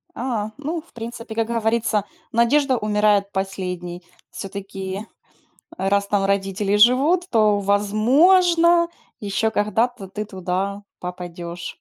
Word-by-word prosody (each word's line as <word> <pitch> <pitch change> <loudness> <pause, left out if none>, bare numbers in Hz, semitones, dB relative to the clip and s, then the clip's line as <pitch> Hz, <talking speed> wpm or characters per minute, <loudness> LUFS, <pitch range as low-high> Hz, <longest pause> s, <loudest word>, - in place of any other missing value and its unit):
А, 225 -4 -2
ну, 315 +3 -3
в - - -26
принципе, 230 0 -7
как 225 -1 0
говорится, 225 -2 0 0.3
надежда 255 +3 +3
умирает 210 -1 +2
последней. 180 -2 -4 0.3
Всё-таки, 195 +1 -6 0.7
раз 200 +1 +1
там 200 -1 +1
родители 195 +1 0
живут, 275 - +4
то, 215 -3 +3
возможно, 330 - +4 0.3
ещё 210 +2 0
когда-то 220 +1 0
ты 210 +2 -5
туда 195 +1 -3 0.2
попадёшь. 175 -1 -6
210 Hz, 105 wpm, -22 LUFS, 195-235 Hz, 0.7 s, живут